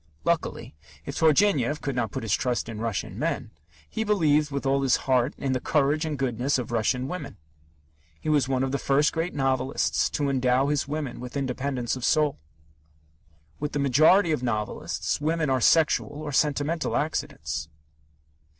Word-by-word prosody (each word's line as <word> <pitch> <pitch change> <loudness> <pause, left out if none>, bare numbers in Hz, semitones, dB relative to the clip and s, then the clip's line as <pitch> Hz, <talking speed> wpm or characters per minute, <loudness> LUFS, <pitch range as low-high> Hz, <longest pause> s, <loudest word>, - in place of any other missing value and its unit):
Luckily, - - -1 0.3
if - - -5
Turgenev 155 - +3
could 140 -3 -3
not 120 -3 0
put - - -4
his 110 -2 0
trust 125 -3 0
in 115 -2 -6
Russian 110 -3 -3
men, - - -2 0.4
he 220 - -3
believed 155 -8 +2
with 140 -1 -4
all 135 +1 +2
his 135 -3 +3
heart 130 0 +2
in 135 - -2
the 130 - 0
courage 150 +3 +1
and 155 -2 -3
goodness 130 +1 0
of 125 -2 -4
Russian 120 +3 0
women. 180 +5 -6 0.8
He - - -9
was 145 -4 +2
one 130 -1 +1
of 135 - -1
the 140 - -1
first 140 +2 +2
great 165 +1 -2
novelists 135 -1 +1
to 145 - 0
endow 130 0 +2
his 145 -2 0
women 145 -4 -4
with 125 +2 -6
independence 130 -2 -2
of 130 - -7
soul. 150 0 +2 1.2
With 150 0 -3
the - - -1
majority 155 +7 +4
of 150 - 0
novelists, 110 +3 -2
women 155 -1 0
are 130 -1 +1
sexual 160 +3 +3
or 145 +1 -6
sentimental 150 +3 0
accidents. 145 - -3
140 Hz, 170 wpm, -26 LUFS, 125-150 Hz, 1.2 s, majority